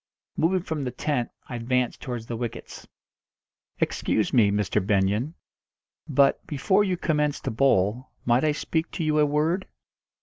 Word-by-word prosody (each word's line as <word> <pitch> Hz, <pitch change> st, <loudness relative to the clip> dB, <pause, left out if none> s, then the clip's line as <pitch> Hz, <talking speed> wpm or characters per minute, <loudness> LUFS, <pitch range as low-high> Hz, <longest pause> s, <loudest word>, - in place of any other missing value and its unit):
Moving 180 Hz, +3 st, +2 dB
from 160 Hz, -5 st, -3 dB
the 130 Hz, -, -2 dB
tent, 125 Hz, 0 st, -2 dB, 0.2 s
I 125 Hz, -, -6 dB
advanced 125 Hz, +1 st, -1 dB
towards 120 Hz, -4 st, -5 dB
the 115 Hz, -, -4 dB
wickets. 120 Hz, 0 st, -6 dB, 0.9 s
"Excuse 110 Hz, -, 0 dB
me, 110 Hz, -5 st, +5 dB
Mr. 105 Hz, 0 st, 0 dB
Benyon, 105 Hz, -, +1 dB, 0.7 s
but 140 Hz, -1 st, +3 dB
before 190 Hz, +8 st, +2 dB
you 185 Hz, -3 st, 0 dB
commence 150 Hz, -4 st, 0 dB
to -, -, -3 dB
bowl 115 Hz, 0 st, +2 dB, 0.2 s
might 120 Hz, +3 st, +3 dB
I 155 Hz, -, +3 dB
speak 160 Hz, +2 st, -2 dB
to 170 Hz, -, -2 dB
you 155 Hz, -1 st, +2 dB
a 150 Hz, -, +4 dB
word?" 155 Hz, +6 st, 0 dB
130 Hz, 155 wpm, -25 LUFS, 115-155 Hz, 0.9 s, me